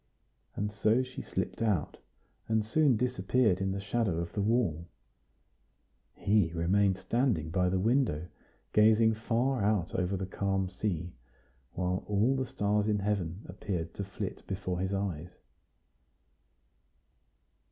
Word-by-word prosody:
And 105 +1 -2
so 110 +4 +2
she 130 0 -7
slipped - - -4
out, 105 -9 0 0.5
and 110 -1 +1
soon 135 +1 +3
disappeared 115 -3 +1
in 95 0 0
the 100 - -2
shadow 100 -3 0
of 85 0 -4
the 105 - -1
wall. 100 -7 +1 1.3
He 100 -5 +2
remained 95 +3 +2
standing 95 - 0
by 90 0 +2
the 95 - +1
window, 110 - +1 0.5
gazing 110 +1 +5
far 120 +3 0
out 100 -4 +1
over 95 +1 0
the 95 - -3
calm 95 0 -1
sea, 90 -4 -3 0.6
while 90 +1 -1
all 105 +6 +2
the 130 -1 -1
stars 105 -5 0
in 105 -1 +2
heaven 100 -2 -2
appeared 90 -3 -4
to 100 - -4
flit 95 0 -5
before 90 -2 -3
his 95 +1 -1
eyes. 90 -4 -3
100 Hz, 130 wpm, -30 LUFS, 90-110 Hz, 1.3 s, gazing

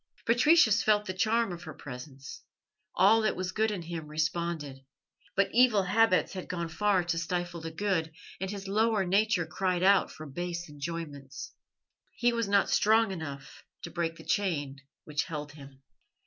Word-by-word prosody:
Patricius 240 -2 +5
felt 210 -1 +2
the 185 - -3
charm 225 +3 +1
of 175 -1 -7
her 155 - -9
presence; 135 +1 -9 0.5
all 215 +4 +5
that 215 - +1
was 185 0 -3
good 220 +3 +1
in 200 -5 -4
him 165 -2 -6
responded; 155 -3 -2 0.5
but 200 0 +3
evil 240 -5 +5
habits 185 -3 +3
had 185 -2 -6
gone 170 -2 -3
far 190 +3 +2
to 170 -1 -1
stifle 175 0 -3
the 165 - -5
good, 165 -2 -1 0.3
and 190 +1 -3
his 200 -1 -6
lower 215 0 +2
nature 200 -1 +2
cried 180 +2 -1
out 195 0 +5
for 155 - -10
base 175 +4 -5
enjoyments. 145 -3 -7 0.6
He 240 0 +2
was 230 -2 -1
not 200 0 +3
strong 220 0 +4
enough 145 -6 -7 0.2
to - - -6
break 165 -1 -2
the - - -13
chain 145 -9 -1 0.3
which 150 -1 -2
held 150 -2 -6
him. 140 -2 -14
175 Hz, 165 wpm, -29 LUFS, 155-205 Hz, 0.6 s, Patricius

